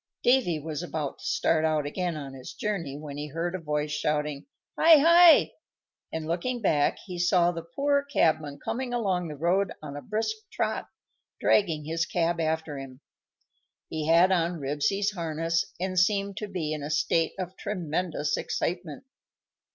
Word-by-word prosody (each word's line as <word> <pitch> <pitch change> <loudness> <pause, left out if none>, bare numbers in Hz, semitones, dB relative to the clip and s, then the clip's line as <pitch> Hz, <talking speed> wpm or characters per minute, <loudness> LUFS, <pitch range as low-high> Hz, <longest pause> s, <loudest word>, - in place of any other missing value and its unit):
Davy 245 -10 +3
was 155 +1 -5
about 160 -5 -4
to - - -11
start 160 -1 +1
out 155 -2 +1
again 175 +2 -2
on 140 -2 -7
his 130 0 -9
journey, 170 -10 -3
when 145 -1 -8
he 150 +1 -4
heard 165 +4 -3
a 185 - -3
voice 150 -2 -2
shouting 150 - -1 0.3
"Hi! 325 -1 +7
Hi!" 335 +2 +7 0.6
and, 160 -1 -4
looking 180 +10 -2
back, 150 -9 +2
he 180 -3 -6
saw 175 0 +3
the 165 -1 -5
poor 280 0 +2
cabman 155 - +1
coming 245 0 -2
along 190 -7 0
the 150 - -6
road 180 +5 +1
on 145 -2 -8
a 145 - -6
brisk 220 - -2
trot, - - -2 0.5
dragging 165 -7 +2
his 165 +1 -1
cab 170 0 0
after 160 -2 -1
him. 130 -1 -10 0.9
He 155 -1 -3
had 170 +3 +5
on 170 -1 +1
Ribsy's 150 +9 0
harness, 165 -2 -1
and 185 0 0
seemed 200 +1 +1
to 210 - -4
be 170 -6 -3
in 150 - -4
a 145 - -5
state 160 +1 +1
of 185 -1 -5
tremendous 170 -6 -2
excitement. 175 - -3
165 Hz, 165 wpm, -27 LUFS, 150-190 Hz, 0.9 s, Hi